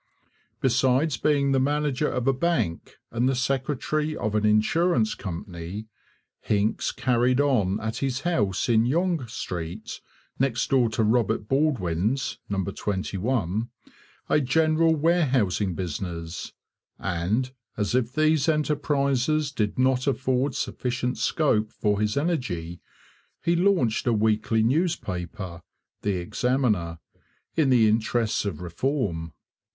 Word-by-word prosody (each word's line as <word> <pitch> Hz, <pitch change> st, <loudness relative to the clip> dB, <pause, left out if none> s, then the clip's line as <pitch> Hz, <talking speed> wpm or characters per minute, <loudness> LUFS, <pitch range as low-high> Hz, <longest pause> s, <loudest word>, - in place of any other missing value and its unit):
Besides 130 Hz, +3 st, +2 dB
being 140 Hz, 0 st, +2 dB
the 135 Hz, -, +3 dB
manager 145 Hz, +1 st, +1 dB
of 125 Hz, -, -2 dB
a 135 Hz, -, +4 dB
bank 130 Hz, -, -1 dB, 0.2 s
and 120 Hz, +3 st, +1 dB
the 135 Hz, -, +1 dB
secretary 140 Hz, +4 st, -1 dB
of 110 Hz, -, -2 dB
an 105 Hz, 0 st, +2 dB
insurance 170 Hz, -, +2 dB
company, 90 Hz, +2 st, -6 dB, 0.5 s
Hincks 105 Hz, +1 st, 0 dB
carried 125 Hz, 0 st, +1 dB
on 110 Hz, -9 st, +2 dB
at 110 Hz, 0 st, -3 dB
his 135 Hz, -1 st, -1 dB
house 105 Hz, -, 0 dB
in 115 Hz, -1 st, +3 dB
Yonge 165 Hz, -3 st, 0 dB
Street, 90 Hz, -2 st, -5 dB, 0.4 s
next 130 Hz, -2 st, 0 dB
door 125 Hz, -4 st, +4 dB
to 110 Hz, 0 st, 0 dB
Robert 110 Hz, -1 st, +1 dB
Baldwin's 130 Hz, -, 0 dB
(number 100 Hz, -1 st, -1 dB
21), 105 Hz, +2 st, -2 dB, 0.6 s
a 150 Hz, -, +3 dB
general 160 Hz, +4 st, +3 dB
warehousing 130 Hz, -, +1 dB
business; 85 Hz, -1 st, -5 dB, 0.5 s
and, 100 Hz, +8 st, -1 dB, 0.3 s
as 105 Hz, +1 st, -1 dB
if 125 Hz, -1 st, +1 dB
these 155 Hz, +2 st, +2 dB
enterprises 150 Hz, -1 st, +1 dB
did 105 Hz, -7 st, -1 dB
not 130 Hz, +1 st, +2 dB
afford 130 Hz, 0 st, 0 dB
sufficient 125 Hz, 0 st, -2 dB
scope 110 Hz, -8 st, +1 dB
for 105 Hz, -3 st, 0 dB
his 105 Hz, +4 st, 0 dB
energy, 120 Hz, -, -2 dB, 0.6 s
he 170 Hz, -, +2 dB
launched 170 Hz, -, +2 dB
a 120 Hz, -, +4 dB
weekly 110 Hz, +1 st, +2 dB
newspaper, 95 Hz, -, -2 dB, 0.4 s
the 100 Hz, -2 st, 0 dB
Examiner, 105 Hz, -3 st, 0 dB, 0.6 s
in 155 Hz, -4 st, +3 dB
the 120 Hz, -4 st, +5 dB
interests 110 Hz, 0 st, +1 dB
of 90 Hz, -5 st, -4 dB
Reform. 85 Hz, -, -2 dB
125 Hz, 120 wpm, -25 LUFS, 105-140 Hz, 0.6 s, the